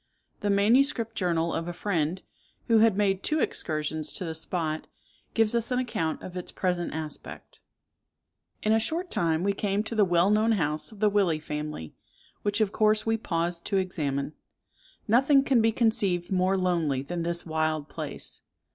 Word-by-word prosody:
The 205 - -1
manuscript 230 +3 +3
journal 170 -4 0
of 165 - -2
a 175 - -3
friend, 175 -2 -1 0.4
who 230 -2 +4
had 220 -3 +4
made 195 -2 +2
two 310 +7 +1
excursions 155 - -2
to 180 - -3
the 165 - -3
spot, 160 -1 -2 0.5
gives 225 -1 +3
us 235 -1 +1
an 250 - 0
account 170 -11 -2
of 180 - -8
its 180 - -5
present 180 -2 -1
aspect. 155 -1 -7 1.0
"In 215 - +3
a 225 - +4
short 335 +10 -2
time 165 0 +1
we 200 +1 +2
came 200 +1 -1
to 220 - -6
the 215 -2 +4
well 175 +1 +3
known 220 +2 +3
house 155 -4 -1
of 215 -1 -14
the 210 - +5
Willey 195 -6 +2
family, 150 - -5 0.5
which 205 +1 0
of 210 -2 +2
course 215 0 +2
we 225 0 +2
paused 170 -5 -2
to 200 - 0
examine. 150 -6 -2 0.7
Nothing 270 +5 +5
can 265 -4 +3
be 225 0 +3
conceived 200 -7 +1
more 190 +1 +2
lonely 165 -8 0
than 170 +4 -4
this 170 +1 -3
wild 155 -2 -1
place. - - -6
185 Hz, 175 wpm, -27 LUFS, 160-220 Hz, 1.0 s, the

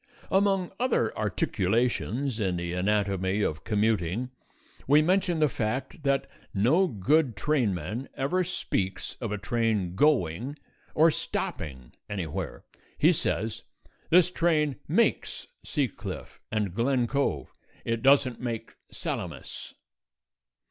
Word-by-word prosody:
Among 195 -2 +2
other 240 - +1
articulations 115 +5 0
in 95 -4 0
the 85 0 -3
anatomy 100 +1 +1
of 75 -3 -2
commuting, 110 +1 0 0.6
we 145 +3 +6
mention 180 0 +2
the 155 -1 +4
fact 130 +5 -3
that 140 -1 +1 0.3
no 145 - +4
good 130 - +2
trainman 110 - -1
ever 180 +8 +1
speaks 100 - -2
of 115 -4 -3
a 105 - -1
train 110 -4 0
going 125 - +1 0.4
or 160 +2 +6
stopping 65 - -4 0.2
anywhere. 80 -10 -4 0.3
He - - +5
says, 110 +1 -1 0.5
"This 180 +1 +6
train 155 -6 +2
makes - - +1 0.2
Sea - - 0
Cliff - - -8
and 105 -4 -1
Glen 125 +3 +2
Cove; 140 +4 -1 0.3
it 115 0 -1
don't 135 -2 +4
make 115 -3 -4 0.2
Salamis." - - -5
115 Hz, 115 wpm, -28 LUFS, 100-145 Hz, 0.6 s, we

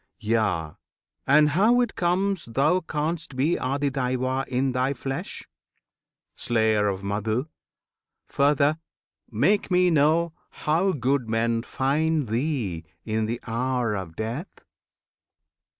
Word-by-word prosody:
Yea, 105 -8 0 0.6
and 150 +2 +6
how 215 +11 +4
it 245 -2 +1
comes 185 +1 0
Thou 140 +10 +2
canst 160 -2 -3
be 145 +7 +2
ADHIYAJNA 130 -1 -1
in 130 +1 0
thy 130 +2 0
flesh? 135 -1 -5 0.9
Slayer 110 -3 +1
of 95 -1 -2
Madhu! 110 +5 -1 0.8
Further, 145 +2 +2 0.5
make 205 +1 +2
me 180 -1 +3
know 160 +2 +3 0.3
How 170 +6 +3
good 130 -3 0
men 115 +1 +1
find 145 +2 0
thee 115 - -1 0.2
in 110 0 -1
the 115 +2 -3
hour 120 0 -1
of 95 -5 -5
death? 115 - -6
135 Hz, 110 wpm, -25 LUFS, 115-155 Hz, 0.9 s, and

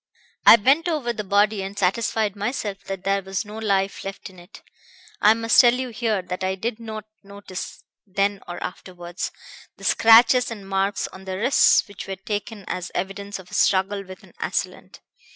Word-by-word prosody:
"I - - +12
bent 270 - +3
over 290 -8 -1
the 215 - -5
body 205 +1 +2
and 195 +1 -6
satisfied 210 +1 0
myself 205 -2 -3
that 195 -1 -6
there 195 0 +1
was 190 +2 -4
no 210 +1 -8
life 195 -3 0
left 195 0 -7
in 185 - -16
it. 175 - -15 0.6
I 215 +2 +6
must 225 +2 +5
tell 240 -1 +5
you 255 0 -3
here 220 -4 -1
that 180 +1 -5
I 190 0 0
did 220 +4 -4
not 220 -2 -7 0.2
notice, 200 -2 -9 0.2
then 200 +1 0
or 175 - -6
afterwards, 175 -1 -6 0.5
the - - -15
scratches 230 +2 +6
and 205 -4 -8
marks 195 +1 -1
on 190 0 -13
the 190 -1 -4
wrists 240 +4 +4
which 205 -2 -9
were 195 - -4
taken 205 +1 -5
as 180 -1 -4
evidence 200 +2 -4
of 185 -2 -14
a - - -13
struggle 195 +1 +2
with 185 -1 -12
an - - -18
assailant. - - -4
200 Hz, 185 wpm, -23 LUFS, 190-225 Hz, 0.6 s, I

